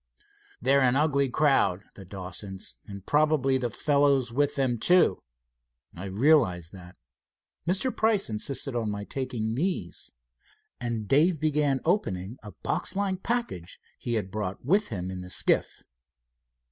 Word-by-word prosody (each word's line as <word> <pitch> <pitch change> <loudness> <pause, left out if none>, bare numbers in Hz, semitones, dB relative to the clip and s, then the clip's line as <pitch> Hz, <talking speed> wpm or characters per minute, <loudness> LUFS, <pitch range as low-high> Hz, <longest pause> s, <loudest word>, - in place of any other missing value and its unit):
"They're 135 +3 +3
an 125 -1 +3
ugly 140 -2 +2
crowd 130 -9 +2
the 100 - -11
Dawsons, 95 +1 -7
and 100 -2 -9
probably 145 -3 +2
the 120 -2 -1
fellows 140 -3 +2
with 145 +2 +1
them, 130 -4 0
too." 180 +9 +4 0.7
"I 90 +3 -7
realize 100 - +2
that. 90 -2 -13 0.7
Mr. 195 +9 +1
Price 220 -3 +2
insisted 125 +4 -1
on 115 -3 -1
my 105 0 -4
taking 120 -2 -3
these," 145 - -3 0.7
and 115 -3 -3
Dave 155 - +3
began 150 -3 +1
opening 115 - -1
a 105 - -10
boxlike 185 - -1
package 235 - -3 0.2
he 120 - -3
had 105 -4 -2
brought 105 0 -4
with 200 +9 +3
him 95 -3 -4
in 90 -1 -6
the 90 - -9
skiff. - - 0
130 Hz, 135 wpm, -27 LUFS, 100-150 Hz, 0.7 s, too